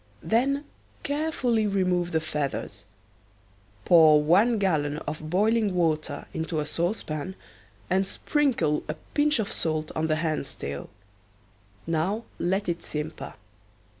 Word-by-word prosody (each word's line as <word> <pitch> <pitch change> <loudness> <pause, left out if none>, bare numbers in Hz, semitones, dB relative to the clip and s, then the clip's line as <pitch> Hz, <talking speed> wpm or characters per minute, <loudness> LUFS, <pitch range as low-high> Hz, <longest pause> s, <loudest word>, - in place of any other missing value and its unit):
Then 275 +5 +1 0.4
carefully 285 -7 0
remove 180 -3 +1
the 160 - +2
feathers. 145 -10 -4 1.0
Pour 160 -3 +7
one 205 +9 +4
gallon 150 -7 +1
of 155 0 -6
boiling 210 +2 +2
water 155 -4 0
into 160 0 -2
a 150 - -1
saucepan 170 0 -3 0.5
and 190 +1 +1
sprinkle 265 - +1
a 150 - -1 0.2
pinch 295 0 +3
of 220 -3 -2
salt 155 -1 -1
on 160 0 0
the 155 - +2
hen's 155 -3 -2
tail. 70 0 -6 1.0
Now 170 +7 0 0.2
let 195 +3 0
it 170 -1 -1
simper. 150 +1 -5
170 Hz, 120 wpm, -26 LUFS, 155-215 Hz, 1.0 s, Pour